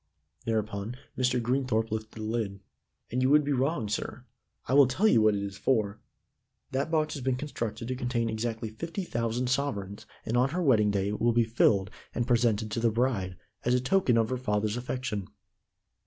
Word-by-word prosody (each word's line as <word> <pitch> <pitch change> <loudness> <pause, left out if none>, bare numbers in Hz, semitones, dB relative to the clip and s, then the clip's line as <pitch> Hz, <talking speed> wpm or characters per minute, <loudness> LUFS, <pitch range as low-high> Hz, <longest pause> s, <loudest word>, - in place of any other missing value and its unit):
Thereupon 110 +1 -2 0.2
Mr. 125 0 +2
Greenthorpe 120 -2 0
lifted 110 0 -4
the 110 - -7
lid. 110 -3 -2 0.5
"And 125 +2 0
you 130 - +3
would 150 +1 +6
be 145 - -1
wrong, 130 -3 0
sir. 105 - -4 0.4
I 130 - -2
will 140 -1 +7
tell 175 - +2
you 115 - +5
what 110 -1 +4
it 100 - -2
is 100 0 -6
for. 110 -5 +1 0.7
That 135 +4 -1
box 155 -2 +1
has 140 - -5
been 130 0 +1
constructed 115 -5 -4
to 130 - -2
contain 120 -2 -1
exactly 110 0 -3
fifty 170 - -4
thousand 120 -3 -1
sovereigns 110 -6 -2 0.2
and 115 - -1
on 125 +2 +3
her 175 +5 -1
wedding 110 -8 +4
day 100 -1 0
it 105 - -4
will 120 0 +3
be 120 0 +4
filled, 105 -4 +2 0.2
and 120 - 0
presented 115 -3 +2
to 110 - -1
the 115 0 +3
bride, 110 -6 0 0.3
as 125 +1 +3
a - - +3
token 130 -1 +2
of 110 -1 +2
her 130 - -1
father's 105 -3 0
affection. 125 -5 -3
115 Hz, 195 wpm, -29 LUFS, 110-130 Hz, 0.7 s, will